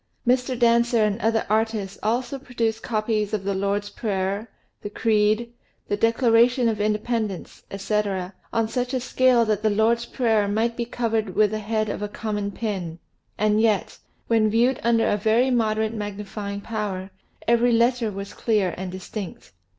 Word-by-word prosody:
Mr. 250 Hz, 0 st, +2 dB
Dancer 235 Hz, -1 st, +3 dB
and 210 Hz, +2 st, -1 dB
other 225 Hz, 0 st, +1 dB
artists 215 Hz, -2 st, -1 dB
also 245 Hz, +5 st, -1 dB
produced 230 Hz, -4 st, -2 dB
copies 215 Hz, -1 st, -1 dB
of 200 Hz, -, -4 dB
the 200 Hz, 0 st, -1 dB
Lord's 200 Hz, +1 st, -1 dB
Prayer, 200 Hz, +1 st, -2 dB, 0.3 s
the 205 Hz, -, -5 dB
Creed, 215 Hz, +2 st, +1 dB, 0.4 s
the 205 Hz, -, +1 dB
Declaration 235 Hz, +2 st, +3 dB
of 215 Hz, -2 st, 0 dB
Independence, 215 Hz, -2 st, -2 dB
etc., 195 Hz, -2 st, -2 dB, 0.2 s
on 225 Hz, -1 st, +1 dB
such 250 Hz, +3 st, -2 dB
a -, -, +1 dB
scale 255 Hz, -1 st, +3 dB
that 215 Hz, -2 st, 0 dB
the 215 Hz, -, +2 dB
Lord's 230 Hz, +3 st, +2 dB
Prayer 220 Hz, -5 st, +1 dB
might 225 Hz, +3 st, 0 dB
be 235 Hz, -, -2 dB
covered 225 Hz, -5 st, -2 dB
with 210 Hz, -1 st, +4 dB
the 215 Hz, -, -2 dB
head 215 Hz, +1 st, -1 dB
of 205 Hz, -, -4 dB
a 210 Hz, -, -1 dB
common 205 Hz, -1 st, -3 dB
pin, 190 Hz, -7 st, -4 dB, 0.4 s
and 215 Hz, +1 st, +2 dB
yet, 215 Hz, -3 st, +1 dB, 0.3 s
when 220 Hz, -2 st, +3 dB
viewed 235 Hz, +4 st, +2 dB
under 230 Hz, -1 st, +2 dB
a 205 Hz, -, +2 dB
very 225 Hz, +5 st, +2 dB
moderate 220 Hz, -2 st, +1 dB
magnifying 205 Hz, -1 st, -5 dB
power, 200 Hz, -4 st, -4 dB, 0.4 s
every 235 Hz, +1 st, +4 dB
letter 235 Hz, 0 st, +2 dB
was 200 Hz, 0 st, -7 dB
clear 210 Hz, -6 st, 0 dB
aftd 190 Hz, 0 st, -4 dB
distinct. 185 Hz, -, -7 dB
220 Hz, 160 wpm, -24 LUFS, 205-235 Hz, 0.4 s, with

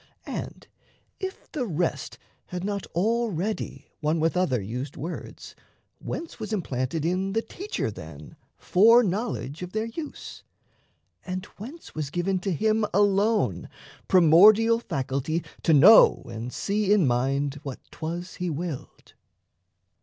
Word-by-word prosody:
And, -, -, -6 dB, 0.5 s
if 380 Hz, 0 st, -7 dB
the 265 Hz, -7 st, -2 dB
rest 170 Hz, -2 st, -2 dB, 0.3 s
had 180 Hz, 0 st, -5 dB
not 200 Hz, -1 st, -3 dB
Already 215 Hz, 0 st, -1 dB
one 155 Hz, +1 st, 0 dB
with 160 Hz, +2 st, +1 dB
other 180 Hz, -9 st, +1 dB
used 120 Hz, +8 st, -5 dB
words, 170 Hz, +5 st, -7 dB, 0.4 s
Whence 330 Hz, -, -6 dB
was 220 Hz, -1 st, -5 dB
implanted 150 Hz, -, -2 dB
in 185 Hz, +3 st, 0 dB
the 225 Hz, +1 st, 0 dB
teacher, 365 Hz, -, -4 dB
then, 80 Hz, -6 st, -11 dB, 0.2 s
Fore 230 Hz, +6 st, +5 dB
knowledge 195 Hz, -, -3 dB
of 180 Hz, 0 st, -7 dB
their 220 Hz, +1 st, -1 dB
use, 290 Hz, +7 st, -8 dB, 0.8 s
and 185 Hz, +1 st, -5 dB
whence 275 Hz, +11 st, -10 dB
was 155 Hz, -3 st, -3 dB
given 180 Hz, +4 st, -1 dB
To 190 Hz, +2 st, -2 dB
him 220 Hz, +5 st, +1 dB
alone 205 Hz, +2 st, +2 dB, 0.4 s
primordial 205 Hz, +7 st, +6 dB
faculty 140 Hz, -, -2 dB, 0.2 s
To -, -, +2 dB
know 190 Hz, +11 st, +7 dB
and 115 Hz, +1 st, -6 dB
see 205 Hz, +4 st, -1 dB
in 205 Hz, -6 st, +5 dB
mind 135 Hz, +3 st, 0 dB
what 135 Hz, -4 st, -6 dB
'twas 175 Hz, +3 st, -6 dB
he 180 Hz, -1 st, -2 dB
willed? 160 Hz, -2 st, -6 dB
180 Hz, 130 wpm, -26 LUFS, 150-215 Hz, 0.8 s, know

